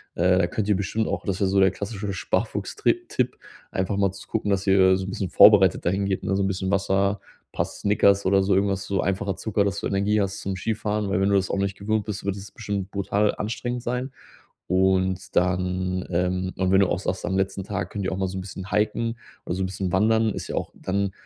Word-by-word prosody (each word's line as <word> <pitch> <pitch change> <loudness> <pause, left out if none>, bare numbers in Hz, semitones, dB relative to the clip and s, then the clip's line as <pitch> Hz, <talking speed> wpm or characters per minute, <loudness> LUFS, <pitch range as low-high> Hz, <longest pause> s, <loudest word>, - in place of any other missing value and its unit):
Äh, 90 +2 +3
da 85 - +2
könnt 100 +3 -2
ihr 105 - +3
bestimmt 100 +3 -1
auch - - -2
das 95 -3 -1
ist - - -10
ja - - +4
so 95 +1 +3
der 95 - +5
klassische 100 0 -5
Sparfuchs-Trip 95 - -1
Tipp, - - -1 0.3
einfach 95 +2 -1
mal 100 -1 +2
zu 100 - -12
gucken, 105 -2 -1
dass 100 0 0
ihr 95 -1 +5
so 95 - -4
'n - - -5
bisschen 95 -1 -3
vorbereitet 95 -5 +6
dahingeht, 95 +2 0
ne, 95 - 0
so 100 - +1
'n - - +1
bisschen 95 0 -2
Wasser, 100 0 +1 0.3
paar - - +1
Snickers 100 -1 +2
oder 95 +1 +4
so 95 0 +2
irgendwas, 100 0 +1
so 100 -1 -1
einfacher 95 0 -1
Zucker, 105 -2 0
dass 100 0 -1
du - - -2
Energie 100 +2 +1
hast 100 0 -2
zum 95 -2 -3
Skifahren, 105 0 -2
weil 95 0 +1
wenn 100 - +2
du 100 - +3
das 95 -1 +1
auch - - -1
nicht 100 0 -1
gewöhnt 110 +1 -1
bist, 105 -1 -6
wird 100 -1 -1
es 100 0 -9
bestimmt 100 -1 -4
brutal 100 +1 +1
anstrengend 120 +3 -3
sein. 125 +2 -2 0.6
Und 95 0 +1
dann, 90 0 0
ähm 90 +1 0
und 95 0 +1
wenn 95 - +5
du 100 - +4
auch - - 0
sagst, 95 -1 -3
am 95 -1 -1
letzten 95 0 -1
Tag 95 -1 -4
könnt 100 - -4
ihr 95 - -1
auch 95 - -3
mal 95 0 0
so 95 - -6
'n - - -3
bisschen 95 +1 -8
hiken 115 +2 0 0.3
oder - - -2
so 95 - -3
n 95 - 0
bisschen 95 -1 -3
wandern, 110 +3 +3
ist - - -6
ja - - -4
auch - - -3
dann 100 +1 -1
95 Hz, 245 wpm, -24 LUFS, 95-100 Hz, 0.6 s, vorbereitet